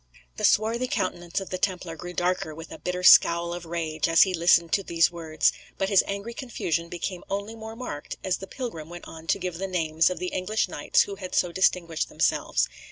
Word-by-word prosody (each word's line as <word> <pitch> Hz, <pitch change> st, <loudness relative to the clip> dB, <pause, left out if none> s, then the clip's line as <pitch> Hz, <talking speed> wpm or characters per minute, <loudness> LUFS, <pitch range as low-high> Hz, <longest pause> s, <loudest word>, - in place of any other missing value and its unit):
The -, -, -5 dB
swarthy 230 Hz, +4 st, +2 dB
countenance 175 Hz, -4 st, -2 dB
of 195 Hz, -, -8 dB
the 185 Hz, -, -3 dB
Templar 180 Hz, -4 st, -2 dB
grew 175 Hz, +2 st, -8 dB
darker 175 Hz, -3 st, -1 dB
with 165 Hz, +1 st, -10 dB
a -, -, -9 dB
bitter 180 Hz, 0 st, -3 dB
scowl 170 Hz, -1 st, +6 dB
of 175 Hz, -1 st, -7 dB
rage 160 Hz, -1 st, -2 dB
as 165 Hz, -, +7 dB
he 190 Hz, -, -1 dB
listened 170 Hz, -1 st, +4 dB
to 200 Hz, -, +3 dB
these 170 Hz, -2 st, +2 dB
words; 160 Hz, -2 st, +1 dB, 0.2 s
but 195 Hz, -, 0 dB
his 200 Hz, -3 st, +5 dB
angry 200 Hz, +4 st, -4 dB
confusion 170 Hz, -9 st, -3 dB
became 175 Hz, +1 st, -4 dB
only 200 Hz, +3 st, -3 dB
more 220 Hz, 0 st, -8 dB
marked 225 Hz, -12 st, -6 dB
as 185 Hz, -1 st, 0 dB
the 195 Hz, -, -9 dB
pilgrim 180 Hz, -, -6 dB
went 175 Hz, 0 st, -9 dB
on 160 Hz, 0 st, -11 dB
to -, -, +2 dB
give 180 Hz, -2 st, -5 dB
the 195 Hz, -, -2 dB
names 165 Hz, -3 st, +2 dB
of 180 Hz, -, -4 dB
the 180 Hz, -, -3 dB
English 195 Hz, +4 st, 0 dB
knights 145 Hz, -5 st, +2 dB
who 200 Hz, -1 st, -7 dB
had 185 Hz, -2 st, -6 dB
so 175 Hz, -, +2 dB
distinguished 170 Hz, -3 st, +1 dB
themselves. -, -, +1 dB
180 Hz, 215 wpm, -26 LUFS, 165-195 Hz, 0.2 s, as